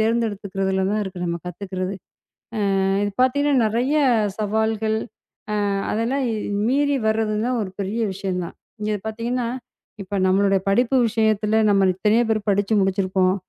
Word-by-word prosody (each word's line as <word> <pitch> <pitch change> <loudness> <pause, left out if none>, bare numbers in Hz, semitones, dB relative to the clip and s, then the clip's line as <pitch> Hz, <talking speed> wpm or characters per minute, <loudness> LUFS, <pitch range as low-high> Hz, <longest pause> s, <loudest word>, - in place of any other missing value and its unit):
தேர்ந்தெடுத்துக்குறதுல 200 -4 0
தான் 215 +1 0
இருக்கு 185 -3 -6
நம்ம 170 0 -2
கத்துக்கிறது. 185 +1 -4 0.9
அ - - +1 0.2
இது 205 -1 -1
பாத்தீங்கன்னா 285 +2 +2
நிறைய 245 +7 0 0.4
சவால்கள். 220 +1 0 0.7
அ - - 0 0.2
அதெல்லாம் 250 +5 0 0.4
மீறி 285 +3 +2
வர்றது 220 -1 0
தான் 250 0 0
ஒரு 190 - -5
பெரிய 200 +4 -2
விஷயம் 190 -2 -3
தான். - - -11 0.3
இங்க 210 -1 -1
பாத்தீங்கன்னா 235 +2 -2 0.5
இப்ப 200 +1 -5
நம்மளோட 195 +1 +3
படிப்பு 245 +6 +2
விஷயத்துல 220 -1 +1
நம்ம 195 -1 +4
இத்தணையோ 215 +5 +2
பேர் 215 -1 0
படிச்சு 200 +2 +1
முடிச்சிருக்கோம். 190 -1 +1
210 Hz, 135 wpm, -22 LUFS, 195-230 Hz, 0.9 s, நம்ம